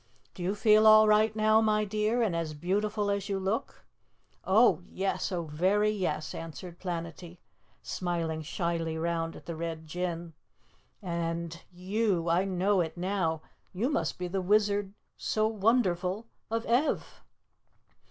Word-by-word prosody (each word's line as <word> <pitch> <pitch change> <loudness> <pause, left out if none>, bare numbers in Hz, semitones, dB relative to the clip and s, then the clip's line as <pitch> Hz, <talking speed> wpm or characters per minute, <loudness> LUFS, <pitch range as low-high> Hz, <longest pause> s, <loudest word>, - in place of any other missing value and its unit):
"Do - - -10
you 185 +4 -1
feel 215 +1 +5
all 215 0 +8
right 215 0 +4
now, 215 0 +4
my 215 -1 +2
dear, 215 +3 0
and 195 -7 0
as 160 -2 -3
beautiful 205 +5 0
as 200 0 -2
you 195 - 0
look?" 195 +4 -3 0.6
"Oh, 210 0 +4
yes! 195 +1 -2
Oh, 175 -2 -2
very 190 +7 +1
yes!" 185 -6 -2
answered 170 +2 -8
Planetty, 175 -1 -6 0.5
smiling 165 -3 -2
shyly 165 0 -2
round 165 0 -2
at - - -12
the 170 - -5
Red 160 -1 -5
Jinn. 170 0 -4 0.7
"And 170 -1 -3
you, 185 -1 0
I 175 +3 +3
know 190 +1 +2
it 160 0 -4
now, 175 -4 -1 0.3
you 220 +8 0
must 160 - -1
be 180 - -3
the 190 +2 -2
Wizard 205 0 +1 0.2
so 215 0 0
wonderful 210 -2 +1 0.2
of 225 +1 -2
Ev?" 250 +6 0
185 Hz, 145 wpm, -29 LUFS, 170-210 Hz, 0.7 s, all